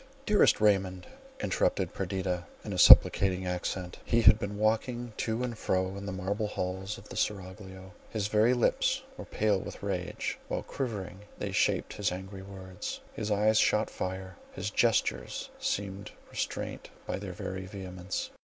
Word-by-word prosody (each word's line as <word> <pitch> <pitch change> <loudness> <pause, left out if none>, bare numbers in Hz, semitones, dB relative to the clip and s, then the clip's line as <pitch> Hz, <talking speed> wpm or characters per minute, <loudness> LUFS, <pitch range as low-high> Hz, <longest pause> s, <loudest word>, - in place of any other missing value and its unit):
"Dearest 210 -2 +5
Raymond!" 95 -3 +2 0.4
interrupted 95 - 0
Perdita, 95 -2 -2 0.2
in - - -4
a - - -2
supplicating 95 -1 +8
accent. 90 0 -3
He 115 - +2
had 105 - +8
been 100 0 -4
walking 115 +2 0
to 115 +2 -1
and 120 -2 -2
fro 95 -2 0
in 100 0 -6
the - - -2
marble 100 +3 -2
hall 95 -2 -3
of 100 +1 -7
the - - -8
seraglio; 95 -1 -4 0.2
his 105 -3 -1
very 110 +4 +4
lips 120 - +2
were - - -8
pale 105 -2 +1
with - - -8
rage, 90 -3 -3
while, - - -2
quivering, 100 -8 -4 0.2
they - - -3
shaped - - +1
his 100 -3 0
angry 95 +1 -6
words— 95 -2 -7
his 105 - -3
eyes 105 +1 +4
shot 105 +1 +3
fire—his 95 +1 -5
gestures 95 - +1
seemed 100 0 -2 0.2
restrained - - -4 0.2
by - - -2
their 95 -2 -6
very 95 +1 -5
vehemence. 95 -1 -5
95 Hz, 150 wpm, -30 LUFS, 95-105 Hz, 0.4 s, supplicating